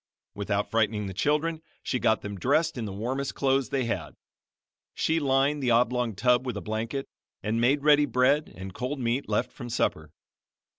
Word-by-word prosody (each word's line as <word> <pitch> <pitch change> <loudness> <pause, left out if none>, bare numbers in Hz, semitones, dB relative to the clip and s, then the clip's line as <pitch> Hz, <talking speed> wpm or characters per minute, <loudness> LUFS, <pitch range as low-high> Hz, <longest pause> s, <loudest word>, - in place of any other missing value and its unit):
Without 100 0 -2
frightening 110 -2 +1
the 95 - -5
children 150 - 0 0.2
she 125 - -1
got 110 - +2
them 100 0 -5
dressed 155 - +2
in 120 -3 -3
the 100 - -5
warmest 130 +7 -3
clothes 135 -1 +1
they 135 -3 0
had. 80 -10 -3 0.8
She 160 +1 +1
lined 140 +1 +2
the 125 - +1
oblong 120 -1 +2
tub 125 +4 +3
with 125 -5 -3
a - - -2
blanket, 110 +7 -3 0.4
and 110 +2 0
made 140 +4 +3
ready 150 -1 +5
bread 135 +4 +2
and 95 0 -8
cold 130 +6 -3
meat 120 +2 -1
left - - 0
from 120 -3 -8
supper. 80 -9 -1
125 Hz, 180 wpm, -27 LUFS, 110-140 Hz, 0.8 s, ready